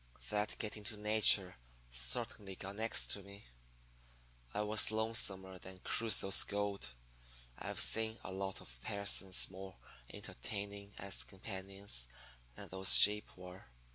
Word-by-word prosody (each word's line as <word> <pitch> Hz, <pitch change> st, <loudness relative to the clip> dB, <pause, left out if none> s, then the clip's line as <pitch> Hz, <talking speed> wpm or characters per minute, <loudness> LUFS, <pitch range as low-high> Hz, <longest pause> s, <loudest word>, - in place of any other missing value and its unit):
That 105 Hz, 0 st, -2 dB
getting 105 Hz, 0 st, -6 dB
next 105 Hz, -, -5 dB
to -, -, -12 dB
Nature 105 Hz, -3 st, +4 dB, 0.4 s
certainly 60 Hz, -, -2 dB
got 95 Hz, +2 st, -9 dB
next 110 Hz, +1 st, 0 dB
to 100 Hz, -, -2 dB
me. 100 Hz, +1 st, -14 dB, 1.1 s
I 105 Hz, -, -3 dB
was 105 Hz, 0 st, +2 dB
lonesomer 100 Hz, -4 st, -2 dB
than 95 Hz, +1 st, -11 dB
Crusoe's 110 Hz, -4 st, +4 dB
goat. 100 Hz, -10 st, -4 dB, 0.6 s
I've -, -, -5 dB
seen 110 Hz, 0 st, +3 dB
a -, -, -7 dB
lot 95 Hz, 0 st, -5 dB
of 60 Hz, 0 st, -11 dB
persons 100 Hz, 0 st, +1 dB
more 95 Hz, 0 st, -10 dB, 0.4 s
entertaining 100 Hz, -, -7 dB
as 100 Hz, 0 st, -3 dB
companions 95 Hz, -, -4 dB, 0.5 s
than -, -, -10 dB
those 95 Hz, 0 st, +6 dB
sheep 105 Hz, -1 st, +6 dB
were. 90 Hz, +1 st, -12 dB
100 Hz, 130 wpm, -35 LUFS, 95-105 Hz, 1.1 s, those